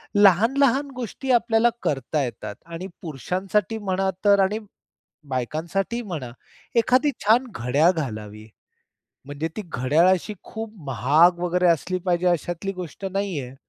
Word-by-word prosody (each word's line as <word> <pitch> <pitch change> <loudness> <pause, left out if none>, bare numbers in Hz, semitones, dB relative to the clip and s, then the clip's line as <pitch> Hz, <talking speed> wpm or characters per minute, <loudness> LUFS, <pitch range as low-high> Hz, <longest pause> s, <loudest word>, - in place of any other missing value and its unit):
लहान-लहान 235 +8 +4
गोष्टी 255 +2 -4
आपल्याला 235 -1 +4
करता 140 +1 0
येतात 120 -4 -6
आणि 170 +3 -7
पुरुषांसाठी 185 - -2
म्हणा 190 -2 -1 0.2
तर 200 -1 +6
आणि 195 +3 +2 0.7
बायकांसाठी 165 - -2
म्हणा, 160 - -6 0.4
एखादी 255 +5 +3
छान 230 +5 +5
घड्याळ 140 +8 +3
घालावी. 110 - -6 0.8
म्हणजे 145 +3 -3
ती 215 - -3
घड्याळाशी 170 - +2
खूप 220 -1 -7
महाग 145 +8 +4
वगैरे 180 +1 +1
असली 170 +3 +1
पाहिजे 175 0 +1
अशातली 175 +3 -1
गोष्ट 180 0 -8
नाही 195 -4 -1
आहे. 125 0 -8
180 Hz, 125 wpm, -24 LUFS, 150-210 Hz, 0.8 s, तर